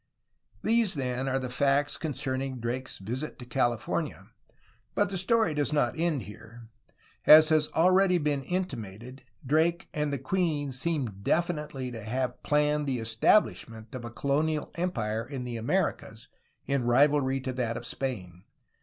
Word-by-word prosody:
These 225 -4 +2
then 130 -1 -2
are 135 - +1
the 130 -1 -3
facts 140 +2 +2
concerning 135 -3 -3
Drake's 125 +3 -3
visit 125 +10 -5
to 125 - -9
Cali 120 -1 +1
fornia, - - -4 0.7
but 205 0 +2
the 195 - -4
story 220 -1 +2
does 145 0 0
not 145 -5 +2
end 160 -6 0
here. 115 +3 -12 0.6
As 155 0 +9
has 155 -1 +3
already 185 +2 +4
been 145 -3 0
intimated, 130 - -5 0.2
Drake 160 +5 +1
and 150 -1 -1
the 140 - -1
queen 145 0 -1
seem 130 - -2
definitely 150 -3 -1
to 115 -2 -7
have 125 +3 -2
planned 150 0 +1
the 130 -2 0
estabHshment 115 - +1
of 130 -2 -6
a 120 - -5
colonial 145 +5 -1
empire 115 -11 -2
in 130 +1 -6
the 120 -1 -4
Americas 115 - -2 0.4
in 140 -2 0
rivalry 135 +2 +3
to 130 0 -4
that 120 -2 -2
of 120 - -7
Spain. 95 -11 -5
135 Hz, 150 wpm, -28 LUFS, 120-155 Hz, 0.7 s, As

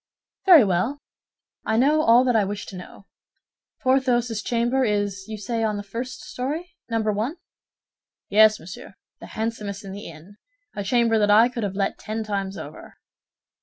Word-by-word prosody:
"Very 340 -8 +9
well; 195 +8 0 0.7
I 220 - 0
know 295 +5 +4
all 240 -3 +5
that 250 -2 +1
I 215 - +4
wish 205 +1 -4
to 195 - -10
know. 185 +2 -11 0.8
Porthos's 245 -4 +1
chamber 240 +3 0
is, 205 -3 -1
you 220 -1 -6
say, 225 +3 -3
on 215 -2 0
the 205 - -5
first 240 +6 -6
story, 310 +7 -5 0.2
Number 220 -2 0
One?" 220 +9 -2 0.9
"Yes, 215 +1 +5
monsieur, 200 - -11 0.2
the - - -10
handsomest 215 -2 -4
in 195 - -7
the 200 +2 -8
inn—a 205 - -12
chamber 230 +1 +2
that 205 -1 +2
I 220 +4 +6
could 240 -1 -5
have 200 -2 -3
let 195 0 -1
ten 220 +1 -4
times 200 -2 -3
over." - - -10
220 Hz, 165 wpm, -23 LUFS, 205-245 Hz, 0.9 s, Very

